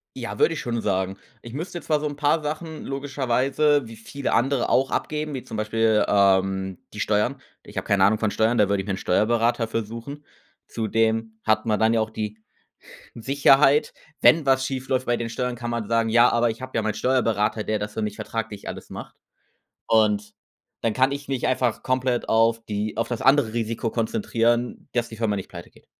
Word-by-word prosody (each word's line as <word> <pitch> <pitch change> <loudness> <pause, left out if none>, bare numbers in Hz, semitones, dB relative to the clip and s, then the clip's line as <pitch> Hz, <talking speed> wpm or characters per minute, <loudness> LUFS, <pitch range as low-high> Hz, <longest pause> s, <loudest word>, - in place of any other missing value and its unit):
ja, - - -6
würde 450 - +3
ich - - -4
schon 120 -2 -2
sagen. 95 -1 -1 0.2
Ich 120 0 -10
müsste 175 +4 -5
zwar 150 -1 0
so 150 - -4
'n 145 -1 -3
paar 150 +2 +1
Sachen 155 +1 -5
logischerweise 140 0 0
wie 115 - -10
viele 135 +5 -4
andere 130 0 +1
auch 135 +1 +2
abgeben, 150 -1 -2
wie 130 - -5
zum 110 - -7
Beispiel, 110 0 +2
ähm, 95 -1 +2 0.2
die 105 - -8
Steuern. 110 +7 0 0.2
Ich - - -13
habe - - -3
keine 100 -1 +3
Ahnung 105 +2 +4
von 110 -2 +1
Steuern, 110 +2 +1
da 105 - +4
würde 100 -1 +1
ich - - -13
mir 100 - -1
'n - - -3
Steuerberater 115 +4 +1
für 115 0 -2
suchen. 115 +7 -8 0.4
Zudem 110 0 -1
hat 110 +1 +1
man 105 -2 +1
dann 110 +1 +3
ja - - +3
auch 110 0 -3
die 110 0 -4 0.8
Sicherheit, 135 +3 +3 0.3
wenn 160 -3 +5
was 130 0 +3
schief 130 -1 -4
läuft 130 -1 0
bei 120 0 +1
den 115 -1 -4
Steuern, 125 +1 -3
kann 120 0 -5
man 120 -3 -3
sagen: 115 -1 +1
„Ja, 120 +2 +6
aber 120 0 +2
ich 115 +3 -6
habe 130 - -7
ja 115 - +2
meinen 105 -1 -2
Steuerberater, 115 -4 +1
der 110 0 -1
das 105 0 -5
für 110 - -3
mich 105 -1 -3
vertraglich 110 -3 -5
alles - - -7
macht.“ - - -9 0.7
Und 105 -1 +2 0.5
dann 115 -2 0
kann 130 +3 +2
ich 140 0 -5
mich 135 -3 -1
einfach 125 -3 0
komplett 130 -1 -1
auf 115 0 +3
die 105 0 -3
auf 115 0 0
das 120 -2 -4
andere 135 -5 +4
Risiko 115 0 -2
konzentrieren, 115 +2 -1
dass 120 -1 -1
die 110 - -10
Firma 110 -3 0
nicht 95 - -6
pleite 85 -1 -10
geht. - - -23
115 Hz, 210 wpm, -24 LUFS, 110-130 Hz, 0.8 s, Ja